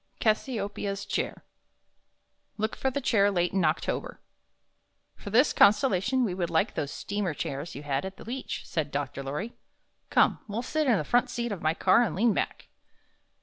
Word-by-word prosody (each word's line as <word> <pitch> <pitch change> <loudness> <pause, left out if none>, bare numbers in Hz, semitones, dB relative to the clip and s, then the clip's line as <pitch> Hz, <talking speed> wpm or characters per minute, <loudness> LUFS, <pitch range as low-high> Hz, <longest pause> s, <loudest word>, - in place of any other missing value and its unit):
CASSIOPEIA'S 205 -3 -1
CHAIR - - -3 1.1
Look 220 +1 -1
for 265 - 0
the 280 +2 -3
Chair 205 -5 +3
late 175 -2 0
in 190 -2 +2
October 155 +1 -1 1.0
"For - - -9
this 245 +8 +4
constellation 210 +4 +4
we 205 -6 0
would 175 -2 -2
like 170 +5 +1
those 140 - -2
steamer 200 -3 -3
chairs 140 +5 -4
you 145 - -7
had 140 -1 -1
at 190 0 -6
the - - -11
beach," 250 +3 -5
said 155 -3 -2
Dr. 140 -2 -3
Lorry. 150 - -4 0.6
"Come, - - +3
we'll 220 +3 -3
sit 310 +3 0
in 235 -5 +4
the 155 - -1
front 240 +10 +2
seat 240 -1 -3
of 195 - -4
my 155 +1 +1
car 190 +6 +4
and 220 -10 0
lean 225 +3 +3
back." - - -3
200 Hz, 175 wpm, -28 LUFS, 165-235 Hz, 1.1 s, this